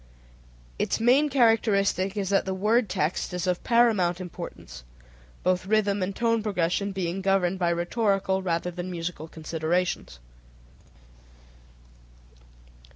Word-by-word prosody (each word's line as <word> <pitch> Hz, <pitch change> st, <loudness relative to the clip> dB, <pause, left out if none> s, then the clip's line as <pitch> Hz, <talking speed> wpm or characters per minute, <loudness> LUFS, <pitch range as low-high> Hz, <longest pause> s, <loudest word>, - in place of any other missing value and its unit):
Its -, -, 0 dB
main 260 Hz, +6 st, +4 dB
characteristic 210 Hz, -6 st, +2 dB
is 195 Hz, -2 st, -1 dB
that 200 Hz, -, +2 dB
the 190 Hz, 0 st, -2 dB
word 215 Hz, +3 st, +2 dB
text 170 Hz, +3 st, -1 dB
is 180 Hz, -, -2 dB
of 180 Hz, -1 st, -1 dB
paramount 215 Hz, -7 st, +3 dB
importance, 175 Hz, -, -8 dB, 0.6 s
both 185 Hz, +1 st, 0 dB
rhythm 205 Hz, -1 st, +1 dB
and 190 Hz, +1 st, -2 dB
tone 230 Hz, -1 st, +1 dB
progression 200 Hz, -1 st, -1 dB
being 190 Hz, -1 st, -3 dB
governed 190 Hz, -1 st, +1 dB
by 175 Hz, -2 st, +2 dB
rhetorical 190 Hz, +2 st, 0 dB
rather 175 Hz, -1 st, -1 dB
than 175 Hz, +1 st, -6 dB
by 185 Hz, -, -5 dB
musical 165 Hz, -2 st, -5 dB
considerations. 160 Hz, -, -2 dB
190 Hz, 120 wpm, -26 LUFS, 175-210 Hz, 0.6 s, main